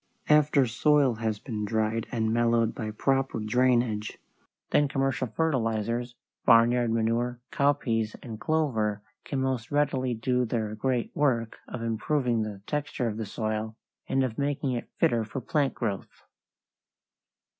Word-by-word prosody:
After 150 -2 +5
soil 140 +2 +3
has 110 -2 -1
been 105 -1 -5
dried 110 +1 0
and 110 -3 0
mellowed 115 -1 +2
by 110 -2 -4
proper 135 +3 0
drainage, 120 -1 +1 0.5
then 145 - +4
commercial 135 -2 0
fertilizers, 120 -3 -1 0.3
barnyard 120 0 +5
manure, 115 +2 0
cowpeas, 140 -9 +1
and 110 -3 -7
clover 115 -11 0 0.2
can 135 -2 -2
most 130 -3 -1
readily 135 -4 +1
do 125 +3 +1
their 110 -3 -2
great 120 +2 -1
work 120 -6 0
of 120 - -6
improving 115 +1 0
the 105 -2 -5
texture 145 -4 -2
of 110 -1 -3
the 110 -2 -4
soil 110 +1 -3 0.3
and 135 - +2
of 125 -2 -3
making 140 -1 0
it 120 -1 -4
fitter 115 -2 +2
for 110 +5 -5
plant 140 +3 0
growth. 105 -5 -4
120 Hz, 135 wpm, -28 LUFS, 110-135 Hz, 0.5 s, After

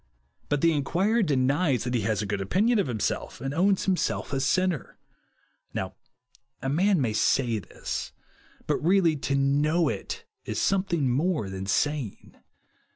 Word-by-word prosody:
But 145 -1 +1
the 165 - +5
inquirer 185 +10 +1
denies 140 - +2
that 125 0 -2
he 120 - +1
has 110 -1 0
a - - -3
good 100 -1 -2
opinion 210 - +2
of 195 - +1
himself, 115 -4 -2
and 135 +1 -3
ov^ns 190 +4 +2
himself 185 -5 -1
a 135 - +1
sinner. 175 +3 0 0.8
Now - - -3 0.7
a 135 - -3
man 185 +6 +3
may 120 -6 0
say 115 0 +2
this; 95 - -5 0.5
but - - +1
really 175 -2 +4
to 140 0 -1
hnoiu 145 +4 +2
it - - -7 0.2
is - - -3
something 185 -7 +1
more 140 - 0
than 95 0 -5
saying. 135 +2 -1
145 Hz, 155 wpm, -27 LUFS, 125-180 Hz, 0.8 s, the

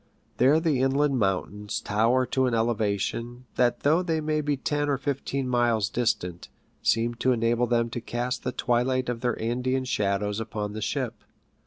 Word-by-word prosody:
There 140 +5 +5
the 155 -6 +1
inland 135 0 +2
mountains 100 +1 -1
tower 115 +5 +2
to 130 +1 +1
an 120 - 0
elevation, 115 +2 -1
that 125 -1 +1
though 155 +5 +3
they 165 -3 0
may 155 0 0
be 145 -1 0
ten 145 +2 -1
or 140 - +2
fifteen 135 -1 -2
miles 120 -5 +2
distant, 95 -8 -1 0.3
seems 115 +1 +1
to 130 - +3
enable 120 +1 +1
them 115 0 +1
to 120 - -4
cast 120 +2 -3
the 125 - -1
twilight 125 +1 0
of 120 -1 -3
their 120 -2 -1
Andean 125 +3 -1
shadows 105 -2 0
upon 105 -2 -4
the 110 - -5
ship. 115 -1 -3
120 Hz, 170 wpm, -26 LUFS, 110-130 Hz, 0.3 s, There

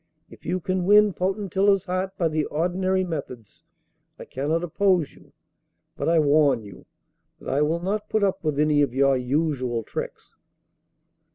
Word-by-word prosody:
If - - -16
you 180 +2 -1
can 185 0 -2
win 210 +1 +5
Potentilla's 195 +1 0
heart 185 +1 -3
by 170 - +1
the 155 -1 -1
ordinary 185 +4 0
methods 135 - -7 0.6
I - - -10
cannot 155 +6 -2
oppose 175 -2 +1
you, - - -20 0.6
but - - -2
I 170 - +3
warn 145 -5 +3
you 100 -3 -13 0.5
that - - -8
I 140 +2 +1
will 160 +3 0
not 205 +4 -3
put 215 -1 0
up 195 -3 0
with 150 -2 -1
any 150 -1 +3
of 140 -3 0
your 135 0 +3
usual 130 -3 -1
tricks. - - -7
165 Hz, 160 wpm, -24 LUFS, 145-190 Hz, 0.6 s, win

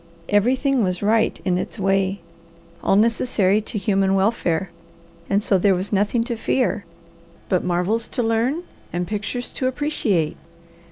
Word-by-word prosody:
Everything 255 +5 +2
was 180 0 -1
right 220 +2 +2
in 180 -1 +1
its - - -5
way, 195 -1 +1 0.6
all - - +3
necessary 215 -2 +2
to 220 +1 -5
human 195 -2 +2
welfare, 190 -3 0 0.6
and 200 +1 +2
so 195 -3 +3
there 195 +1 +4
was 185 +4 -3
nothing 205 +4 +2
to 235 0 -3
fear, 225 -3 0 0.6
but 185 - +1
marvels 180 +6 0
to 245 - -2
learn 235 +9 0 0.3
and 175 +1 -2
pictures 215 +5 -4
to 255 - -2
appreciate. 235 - 0
205 Hz, 145 wpm, -22 LUFS, 190-230 Hz, 0.6 s, there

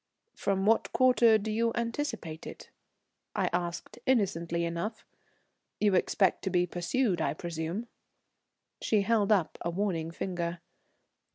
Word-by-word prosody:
"From 195 -1 -1
what 225 +2 +3
quarter 245 -3 +5
do 215 +1 -3
you 230 +2 +1
anticipate 230 - -3
it?" - - -10 0.6
I - - +1
asked 175 -1 -3
innocently 170 -8 +1
enough. 170 +7 -4 0.7
"You 205 -2 +3
expect 190 +1 +2
to - - +1
be 180 -1 +2
pursued, 180 +4 0
I - - 0
presume?" 170 +7 -4 0.9
She 215 -2 +2
held 215 -1 +2
up 190 -6 +2
a 170 - -1
warning 170 -3 -1
finger. 170 0 -3
195 Hz, 125 wpm, -30 LUFS, 170-220 Hz, 0.9 s, quarter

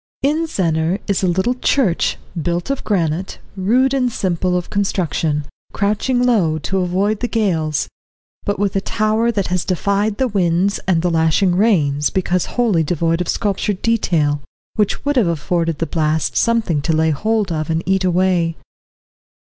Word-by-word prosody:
In 310 +4 +1
Zennor 165 - 0
is 200 -2 0
a 190 - +1
little 190 +7 +1
church, 250 -7 +1 0.2
built 175 - -2
of 275 - -3
granite, 180 -3 -1 0.2
rude 245 +8 +2
and 250 -3 +1
simple 180 -3 0
of 175 - -5
construction, 165 -7 -1 0.3
crouching 215 +5 0
low, 185 -11 +2
to 190 +5 -2
avoid 190 +4 0
the 245 - -1
gales, 165 -10 0 0.6
but 205 - -1
with 200 0 -1
a 195 - +1
tower 215 +3 +1
that 200 -4 -1
has 180 -1 0
defied 200 +3 0
the 260 - +1
winds 190 -2 +1
and 170 -3 +2
the 175 - +1
lashing 165 +3 +2
rains, 150 -9 +2
because 180 -1 0
wholly 220 -9 +3
devoid 165 +1 0
of 180 - -3
sculptured 200 -1 -1
detail, 160 -10 +1 0.3
which 210 +5 -1
would 290 -1 +1
have 225 -8 +3
afforded 165 0 -1
the 165 - -1
blasts 155 -1 0
something 225 -10 +1
to 165 +3 0
lay 160 0 +2
hold 215 +4 0
of 155 -1 -2
and 165 +1 0
eat 190 0 +1
away. 180 -2 +1
185 Hz, 160 wpm, -18 LUFS, 165-215 Hz, 0.6 s, wholly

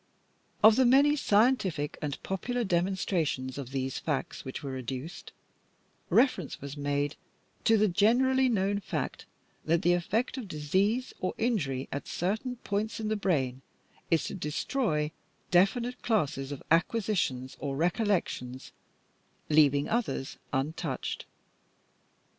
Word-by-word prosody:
Of 220 +1 +8
the 260 - +5
many 280 +4 +6
scientific 205 - +2
and 145 -3 -2
popular 245 +6 -2
demonstrations 170 - 0
of 130 -3 -6
these 135 -1 -2
facts 150 -4 -3
which 130 - -6
were 135 -2 -4
adduced, 130 +6 -6 0.8
reference 230 - +2
was 140 0 -7
made 145 0 -1 0.5
to 225 - +5
the 215 0 +4
generally 250 +7 +3
known 200 -2 +1
fact 200 - -4 0.4
that 165 +1 +1
the 175 - +5
effect 220 +9 0
of 230 - -6
disease 190 - 0
or 185 - -2
injury 150 - 0
at 140 - -4
certain 220 +8 -2
points 220 0 -3
in 215 -1 -2
the 215 - +1
brain 135 -11 0 0.5
is 165 - +3
to - - -4
destroy 155 - -1 0.4
definite 235 +8 +2
classes 145 - 0
of 140 - -6
acquisitions 165 - +1
or 135 0 -3
recollections, 165 - -1 0.8
leaving 145 -2 +4
others 220 - -2
untouched. 145 +1 -3
175 Hz, 125 wpm, -29 LUFS, 145-220 Hz, 0.8 s, Of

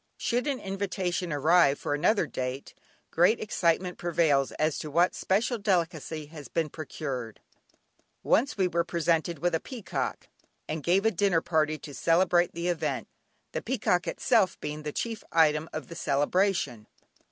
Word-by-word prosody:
Should 245 +4 -1
an 275 -3 -1
invitation 190 -2 -2
arrive 145 0 +4
for - - -3
another 180 +9 +2
date, 130 +1 -5 0.4
great 180 +7 +4
excitement 180 -3 0
prevails 160 -6 +2
as 155 -1 0
to 155 - -5
what 170 +5 +3
special 225 +5 0
delicacy 165 -6 -1
has 150 -1 -10
been 165 -2 -1
procured. 135 -7 -6 0.8
Once 275 +2 +2
we 190 -2 +3
were 170 -1 0
presented 170 0 0
with 175 +3 0
a 165 - +2
peacock, 240 0 -4 0.4
and 155 0 -3
gave 185 +7 +2
a 225 - +4
dinner 190 -3 +2
party 155 -2 +1
to 145 0 -10
celebrate 175 +4 +3
the 170 +1 -3
event, 175 -2 -2 0.4
the - - -3
peacock 220 -7 0
itself 215 -7 +2
being 150 +1 -5
the 150 0 -4
chief 225 +6 -4
item 155 -1 +3
of 155 - -6
the 170 - -9
celebration. 145 - 0
170 Hz, 150 wpm, -28 LUFS, 150-190 Hz, 0.8 s, arrive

